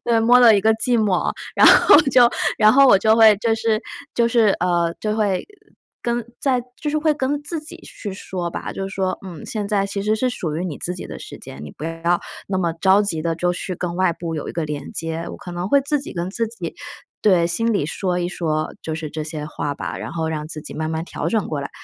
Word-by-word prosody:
对， 230 -1 +3
摸 240 +2 +6
了 230 -4 +7
一 - - +2
个 220 +2 +4
寂 240 +2 +1
寞， 200 -5 +1 0.2
然 - - +7
后 405 - +8
就 250 -4 +5 0.3
然 215 0 +6
后 275 +1 +7
我 225 - +7
就 220 +2 +3
会 220 -2 +7
就 225 +2 +1
是 220 -1 0 0.3
就 235 -1 +3
是， 230 -2 +4
呃， 170 -1 +1
就 215 0 -1
会 200 -4 0 0.6
跟 235 0 -1 0.2
在 260 -3 +1 0.2
就 300 - -2
是 300 - 0
会 310 0 +2
跟 285 +1 -1
自 320 +2 -5
己 310 +3 -11
去 205 - -8
说 185 -2 -5
吧， - - -5
就 195 0 -4
是 195 - -9
说： 190 -1 -1
“嗯， 175 -4 -9
现 210 -2 -4
在 200 -1 +1
其 200 0 -4
实 210 +1 +1
是 255 +3 0
属 160 -10 -4
于 175 - -2
你 165 -6 -5
自 180 - -4
己 180 - -7
的 - - -8
时 - - -10
间， 70 - -10
你 75 - -8
不 - - -14
要 165 +2 0 0.3
那 190 -1 -1
么 170 -3 0
着 190 +4 +4
急 175 -6 -2
地 165 0 0
就 175 +2 0
去 180 +1 -4
跟 175 0 -4
外 185 -2 +2
部 165 0 -5
有 150 - -5
一 - - -5
个 165 - -2
连 150 -2 -6
接”。 165 0 -4
我 - - -8
可 180 - -9
能 175 +2 -3
会 280 +5 +5
自 290 +2 0
己 275 - -8
跟 175 +1 -3
自 230 +3 -1
己 190 -7 -7 0.5
对， 180 -5 +4
心 230 +7 0
里 200 -9 0
说 180 +2 -2
一 175 - -1
说 155 -3 -2
就 160 -1 -4
是 160 -1 -5
这 155 +1 -5
些 150 -1 -5
话 145 -1 -4
吧， - - -5
然 - - -6
后 160 -1 -2
让 155 -1 -4
自 155 -1 -7
己 - - -10
慢 155 0 -3
慢 160 0 -2
调 - - -4
整 220 -3 0
过 150 -3 -3
来。 140 - -6
190 Hz, 275 characters per minute, -21 LUFS, 165-225 Hz, 0.6 s, 后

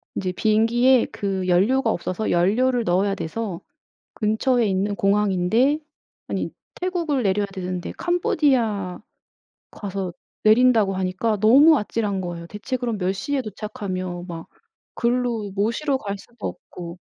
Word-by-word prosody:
이제 185 -1 -1
비행기에 230 +6 +3
그 190 -2 -2
연료가 225 +8 +3
없어서 185 +4 -2
연료를 235 +8 +2
넣어야 195 +1 +1
돼서 190 +1 -4 0.5
근처에 230 +3 +1
있는 200 +1 0
공항인데 205 +7 +2 0.5
아니 - - -2 0.3
태국을 340 -7 -1
내려야 200 +1 +2
되는데 180 -2 -4
캄보디아 250 - +1 0.7
가서 195 -3 -5 0.3
내린다고 220 -3 +5
하니까 190 +4 0
너무 285 +8 +7
아찔한 205 -3 -2
거예요. 170 -2 -6
대체 210 +7 -4
그럼 235 -3 -2
몇 185 -1 0
시에 265 +8 -2
도착하면 185 -5 -5
막 165 -2 -7 0.5
거기로 235 -4 0
모시러 235 +8 0
갈 200 -5 -5
수도 235 +2 -8
없고. 175 0 -9
210 Hz, 300 characters per minute, -23 LUFS, 185-245 Hz, 0.7 s, 너무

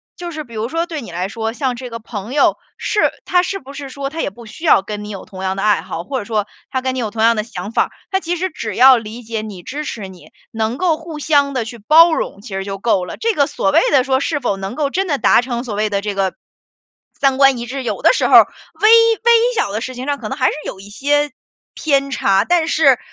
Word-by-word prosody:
就 350 -1 -6
是 310 -2 -6
比 235 -4 -16
如 220 +2 -3
说 330 +4 -1
对 325 -4 -5
你 230 - -9
来 180 +2 -2
说， 225 +2 -4
像 260 -2 -1
这 250 +1 -7
个 230 - -6
朋 225 +1 -7
友， 290 - +4 0.2
是 425 - -1 0.3
他 360 -1 +3
是 390 +2 -3
不 275 -5 -12
是 280 -1 -7
说 275 +1 -5
他 325 +1 -4
也 - - -1
不 230 +5 -14
需 220 +9 -12
要 250 - +5
跟 210 0 -6
你 210 - -8
有 195 -2 -7
同 190 -1 -10
样 190 0 -2
的 195 - -2
爱 210 -1 +3
好， 175 -2 -6
或 265 +7 -3
者 205 - -7
说 215 -2 -1 0.2
他 260 - -2
跟 260 0 -1
你 260 - -3
有 220 -3 -2
同 220 +1 -2
样 230 +1 +5
的 215 - -1
想 205 -2 -7
法， - - +1 0.2
他 380 - +2
其 350 -1 -2
实 370 +1 -2
只 215 -9 -5
要 260 +2 +8
理 230 +1 -6
解 225 -1 -4
你、 205 -5 -8
支 295 - -5
持 210 -8 -5
你， 185 -2 -14 0.2
能 225 +2 -2
够 345 -4 +1
互 320 -1 -8
相 285 -2 +2
地 235 -3 -1
去 235 0 -9
包 320 +9 +6
容， 200 - -3
其 215 - -11
实 195 0 -3
就 195 0 -5
够 195 -3 +1
了。 - - -8
这 455 -1 0
个 285 -4 +2
所 195 -9 0
谓 - - +5
的 275 -4 +4
说， 265 0 +1
是 290 +1 -1
否 240 -7 -1
能 195 +3 -6
够 285 -1 -1
真 385 +4 -1
的 290 -4 0
达 235 - +4
成， 240 -1 -4
所 240 -5 -5
谓 215 +1 0
的 200 -1 0
这 205 0 -3
个， 195 -2 -1 0.8
三 270 -1 +2
观 275 -2 +5
一 235 - -5
致， 265 +2 -5
有 - - -3
的 - - +7
时 - - +1
候， - - +5
微 - - +12
微 455 +5 +3 0.2
小 200 - 0
的 215 - -2
事 255 0 -5
情 255 +2 -6
上 285 -1 -1
可 215 - -6
能 265 - -4
还 255 - +1
是 - - +1
有 190 - -6
一 200 +1 -12
些 290 +6 0 0.4
偏 275 -2 0
差， 195 -6 +2
但 345 0 +2
是 280 -6 +4
250 Hz, 295 characters per minute, -18 LUFS, 210-295 Hz, 0.8 s, 微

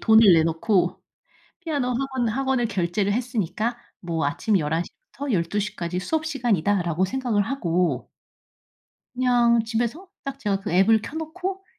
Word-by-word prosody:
돈을 220 -3 +7
내놓고 165 +3 +1 0.6
피아노 295 -7 -1
학원 260 -1 -1
학원을 260 +1 0
결제를 195 0 0
했으니까 230 -1 -2 0.2
뭐 165 -4 -1
아침 195 +8 +1
11:00 160 +2 -1 0.2
부터 285 -2 -4
12:00 205 +4 -1
까지 175 +1 -3
수업 315 - -1
시간이다.'라고 200 - +1
생각을 240 -2 0
하고 180 -8 -1 1.1
그냥 240 -2 +3
집에서 235 - -2 0.2
딱 275 0 -5
제가 205 -7 -1
그 205 - -5
앱을 205 +5 +4
켜 295 - -7
놓고 370 +4 -4
220 Hz, 275 characters per minute, -24 LUFS, 180-260 Hz, 1.1 s, 돈을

